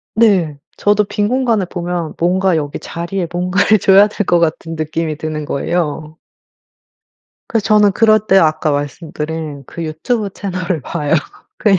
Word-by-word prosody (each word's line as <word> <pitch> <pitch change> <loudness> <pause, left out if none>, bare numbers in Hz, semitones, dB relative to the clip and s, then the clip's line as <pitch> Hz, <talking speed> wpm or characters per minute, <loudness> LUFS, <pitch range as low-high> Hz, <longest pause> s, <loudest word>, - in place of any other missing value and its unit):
네. 190 -10 +3 0.2
저도 210 0 +2
빈 205 +1 -1
공간을 235 -6 +1
보면 175 -2 -4
뭔가 185 +1 +2
여기 145 -2 -3
자리에 170 +1 -4
뭔가를 180 +4 +2
줘야 195 +2 +6
될 210 -1 -3
것 175 - +3
같은 165 0 -1
느낌이 155 0 -2
드는 155 -1 -4
거예요. 155 +1 -2 1.3
그래서 225 -3 0
저는 210 -1 +4
그럴 215 +1 +4
때 195 - +5
아까 155 -3 +2
말씀드린 150 0 -4
그 170 - -7
유튜브 200 +8 -2
채널을 185 -4 -3
봐요 150 +4 -1 0.4
그냥. 200 -3 +3
175 Hz, 295 characters per minute, -16 LUFS, 155-200 Hz, 1.3 s, 줘야